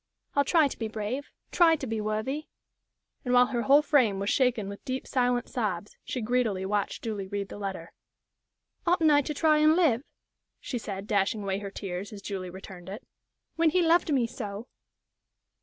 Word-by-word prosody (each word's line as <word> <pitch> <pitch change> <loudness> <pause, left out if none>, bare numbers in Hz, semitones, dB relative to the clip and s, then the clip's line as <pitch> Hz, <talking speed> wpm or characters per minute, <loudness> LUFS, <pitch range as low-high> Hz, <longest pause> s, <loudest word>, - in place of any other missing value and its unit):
I'll 285 - +4
try 315 0 +4
to - - -8
be 225 - -2
brave 220 +6 -4 0.2
try 335 -2 +5
to 295 -3 -5
be 225 -3 -2
worthy 220 +8 -2 0.4
" - - -53
And 250 -1 +1
while 245 0 +7
her 245 -2 -2
whole 280 +5 +5
frame 255 -10 +3
was 200 +1 -1
shaken 250 -6 +2
with 200 0 -8
deep, 260 0 -3
silent 245 -2 +1
sobs, 205 -5 -3
she 250 - -4
greedily 220 -5 0
watched 205 0 -2
Julie 210 -4 -3
read 200 0 -4
the - - -8
letter. 190 -4 -5 0.9
"Oughtn't 335 -3 +4
I 290 0 +5
to 300 - -4
try 310 0 +4
and 310 +1 +5
live," 300 -10 +3 0.6
she 245 - -4
said, 195 -2 -6
dashing 205 0 0
away 195 0 -1
her 200 -1 -6
tears, 195 +1 -5
as 200 -2 -10
Julie 190 -3 -4
returned 185 0 -10
it, 205 +5 -7 0.5
"when 330 -1 +4
he 360 +2 +2
loved 330 -1 +3
me 260 -4 +3
so?" 215 -1 -6
225 Hz, 190 wpm, -28 LUFS, 200-280 Hz, 0.9 s, while